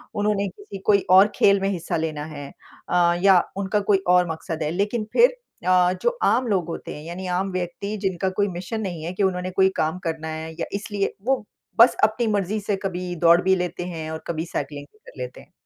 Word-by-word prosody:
उन्होंने 205 -1 +1
किसी 405 - -10
कोई 200 -2 +4
और 190 +2 +8
खेल 200 0 +4
में 195 - +1
हिस्सा 180 -4 -2
लेना 155 -2 -3
है 145 -1 -7 0.4
अ, 175 -1 +4
या 190 -2 +7 0.2
उनका 200 +1 0
कोई 200 - +6
और 180 -1 +4
मकसद 160 0 -4
है 150 - -1
लेकिन 205 +5 -1
फिर 485 +1 +6 0.4
अ, 180 -1 +4
जो 485 0 0
आम 235 +5 +3
लोग 190 -6 0
होते 165 - -6
हैं 150 - -9
यानी 175 +3 -6
आम 195 +1 -1
व्यक्ति 185 +3 -4
जिनका 190 0 -1
कोई 205 - +3
मिशन 220 +5 -4
नहीं 175 -6 -4
है 170 +3 -4
कि 195 - -1
उन्होंने 185 -1 0
कोई 190 +1 +4
काम 160 +3 0
करना 160 -1 -3
है 160 0 -5
या - - -1
इसलिए 200 0 -2
वो 260 -4 +1 0.3
बस 235 - +7
अपनी 220 +2 +3
मर्ज़ी 205 0 0
से 205 0 -1
कभी 180 -2 -3
दौड़ 170 +1 +5
भी 190 +1 +3
लेते 180 -1 -3
हैं, 160 -3 -5
और 160 - -6
कभी 165 -1 -2
साइकिलिंग 145 -3 -5
भी - - -25
कर - - -13
लेते 125 0 -6
हैं। - - -21
185 Hz, 220 wpm, -23 LUFS, 165-200 Hz, 0.4 s, और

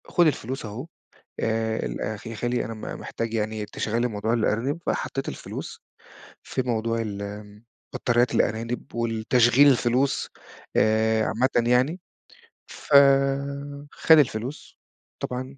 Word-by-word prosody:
"خُد 175 -2 +4
الفلوس 130 -3 -2
أهوه 110 +8 -7 0.5
آآ 110 - -1
ال - - -5 0.3
يا 115 - -5
خالي 120 +3 -1
أنا 115 - -5
م 110 - -11 0.2
محتاج 115 0 -4
يعني 110 -1 -2
تشغّل 110 +2 -2
لي - - +2
موضوع 110 0 -2
الأرانب."، 120 +6 0
فحطيت 135 - -2
الفلوس - - -7 0.6
في 130 - -2
موضوع 115 -2 -1
ال 105 0 -6 0.3
بطاريات 120 0 +1
الأرانب 115 +3 -1
والتشغيل 120 +3 +4
الفلوس 130 +1 +2 0.5
آآ 110 0 +3
عامةّ 120 0 +1
يعني، 130 +9 +2 0.7
ف - - -7 1.0
خَد 160 - +5
الفلوس 125 0 -2 0.4
طبعًا 130 +2 -5
115 Hz, 120 wpm, -25 LUFS, 110-125 Hz, 1.0 s, خَد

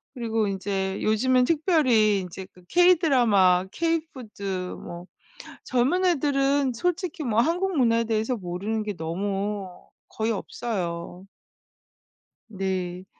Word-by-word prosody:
그리고 225 -3 -1
인제 195 0 -2
요즘은 250 +4 +3
특별히 260 - +3
인제 185 +1 -7
그 180 - -20
K-Drama, 240 - +4
K 330 +3 0
food, 220 -6 -11 0.3
뭐 175 0 -9 0.6
젊은 270 +9 +1
애들은 280 -4 +2
솔직히 350 +3 -2
뭐 230 -3 +2
한국 355 +6 0
문화에 230 -3 +3
대해서 225 +2 -1
모르는 200 +3 -3
게 210 -3 -4
너무 195 +4 -3 0.4
거의 220 +1 -1
없어요. 180 -5 -4 1.2
네. 185 -3 -3
220 Hz, 250 characters per minute, -25 LUFS, 190-275 Hz, 1.2 s, K-Drama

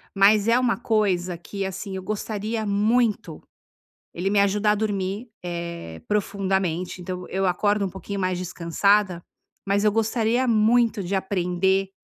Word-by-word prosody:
mas 205 +2 +5
é 240 +2 +5
uma 245 -2 +2
coisa 190 -7 0
que, 195 +3 -5
assim, 190 +1 -5
eu 190 - -5
gostaria 215 +1 -3
muito 210 -3 +1 0.8
Ele 185 +3 -1
me 205 - +2
ajudar 205 +1 +2
a - - +2
dormir, 205 +1 -2 0.2
eh, 170 - -6
profundamente. 190 -4 -1
Então 180 0 -5
eu 195 +1 -1
acordo 205 +3 +1
um - - -5
pouquinho 195 +1 -6
mais 185 -1 0
descansada, 180 +2 +1 0.5
mas 200 +1 +1
eu 210 - +5
gostaria 225 +3 +1
muito 225 -1 +3
de 185 +3 -3
aprender 190 0 0
200 Hz, 145 wpm, -24 LUFS, 185-215 Hz, 0.8 s, mas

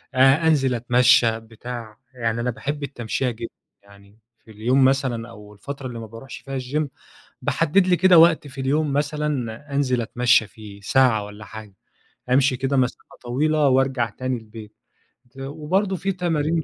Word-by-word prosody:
أ 135 +5 +5
أنزل 135 -5 +2
أتمشى 120 -1 +4
بتاع، 115 0 -9 0.2
يعني 115 -2 -2
أنا 125 - -1
باحب 145 +5 -5
التمشية 125 -1 -2
جدًا 115 0 -7 0.3
يعني 100 +1 -20 0.3
في 110 - -15
اليوم 125 +6 +2
مثلًا 130 -4 0
أو 105 -2 -13
الفترة 135 +6 -7
اللي 120 -2 -7
ما 115 - -7
باروحش 115 +5 -10
فيها 135 -1 -5
الgym، 145 +4 -2 0.5
باحدد 175 +4 +2
لي 180 - +4
كده 185 -1 +5
وقت 165 -2 +5
في 135 -1 -7
اليوم 145 +2 0
مثلًا 145 -4 -2
أنزل 130 -4 +1
أتمشى 115 -1 +2
فيه 105 -3 -13
ساعة 110 -2 +2
والّا 105 +1 -11
حاجة، 105 -3 -11 0.6
أمشي 130 +1 +3
كده 135 +2 -1
مسافة 125 -1 -2
طويلة 150 +4 +1
وأرجع 130 -3 +1
تاني 130 +3 -3
البيت. 110 -1 -12 0.6
ت 135 - -22
وبرضه 160 +8 -1
في 195 +2 -2
تمارين 165 -3 -1
130 Hz, 160 wpm, -22 LUFS, 115-145 Hz, 0.6 s, أ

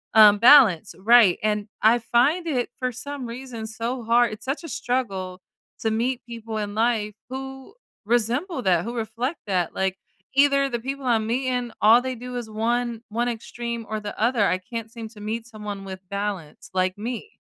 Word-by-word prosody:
Um 210 -2 +8
balance, 235 - +6
right, 215 -1 +6
and 210 -1 0 0.2
I 225 +3 +6
find 270 +10 +2
it, 255 -6 0
for 255 -1 -1
some 255 +1 -6
reason, 235 -2 -7
so 230 +3 -4
hard 235 0 +3
it's 215 +1 -10
such 275 +6 -3
a - - -6
struggle 195 -8 -3 0.4
to 220 - 0
meet 240 +3 0
people 230 -2 -6
in 205 -1 -3
life 220 -2 +1 0.2
who 265 +7 -7 0.3
resemble 245 - 0
that, 180 -4 +2
who 235 +1 -5
reflect 235 +6 -3
that, 180 -4 0
like, 190 0 -1 0.4
either 275 0 +4
the 240 -2 -2
people 270 +3 -5
I'm 225 -3 +2
meeting, 250 0 -1
all 225 +3 +7
they 260 0 -3
do 250 +1 -7
is 235 -2 -5
one 235 +1 -1
one 235 +3 -1
extreme 235 0 -5
or 215 0 -2
the 210 -1 -7
other 230 -1 +3
I 185 - +1
can't 225 +3 -7
seem 230 -1 -8
to 215 -1 -15
meet 225 +2 -4
someone 210 -3 -7
with 190 -1 -7
balance 200 0 -4
like 185 0 0
me. 245 - -6
230 Hz, 180 wpm, -24 LUFS, 215-250 Hz, 0.4 s, Um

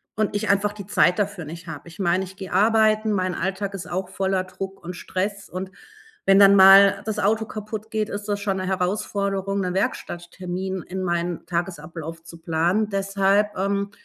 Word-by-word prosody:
und 215 -1 -1
ich 210 +2 -1
einfach 200 +1 +2
die 205 -2 -9
Zeit 180 -3 +3
dafür 205 -3 -2
nicht 170 +3 -9
habe. 160 0 -8
Ich 170 - -15
meine, 185 0 +1
ich 190 +1 -12
gehe 190 -2 -7
arbeiten, 215 +2 +3
mein 185 -2 0
Alltag 195 +2 -2
ist 195 -2 -7
auch 185 +1 -2
voller 190 0 0
Druck 195 +1 -7
und 175 +1 -6
Stress, 200 +3 -4
und 185 +1 -5 0.5
wenn 195 0 +6
dann 200 0 +8
mal 195 0 +8
das 215 -1 -2
Auto 215 +2 +1
kaputtgeht, 215 0 -4
ist 205 0 -5
das 205 -1 -1
schon 195 -2 -1
'ne 185 0 -3
Herausforderung, 195 +1 -1
'ne 180 -1 -2
Werkstatttermin 185 0 -3
in 190 +1 -5
meinen 175 -1 -2
Tagesablauf 170 -2 -5
zu 170 0 -12
planen. 175 +6 +1
Deshalb 195 +1 +1
ähm 200 +1 -1
195 Hz, 180 wpm, -23 LUFS, 180-205 Hz, 0.5 s, dann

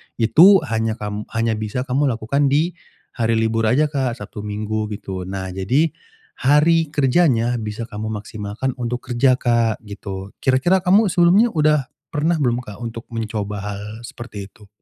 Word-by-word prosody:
Itu 165 - +6
hanya 110 -4 -1
kam 105 -1 -5
hanya 115 -1 0
bisa 110 +4 -3
kamu 135 +3 +1
lakukan 130 +4 0
di 150 +6 +2 0.4
hari 115 -1 0
libur 110 0 +1
aja 145 +6 +2
Kak, 130 -5 -1
Sabtu, 105 -2 -9
Minggu 105 +1 -2
gitu. 95 -2 -6
Nah, 95 -1 -5
jadi 125 - +1 0.5
hari 160 +4 +4
kerjanya 130 -5 +2
bisa 110 +1 -5
kamu 110 -1 -6
maksimalkan 105 +4 -4
untuk 125 +1 -4
kerja 130 +2 +4
Kak, 115 -3 0
gitu. 100 -2 -7
Kira-kira 135 +9 +3
kamu 190 +2 +3
sebelumnya 180 +8 +4
udah 150 - +2 0.2
pernah 160 +2 0
belum 125 -3 0
Kak, 105 -4 -10
untuk 115 -1 -6
mencoba 110 -2 -3
hal 100 0 -5 0.2
seperti 105 -6 -8
itu? 105 0 -20
120 Hz, 155 wpm, -20 LUFS, 105-145 Hz, 0.5 s, Itu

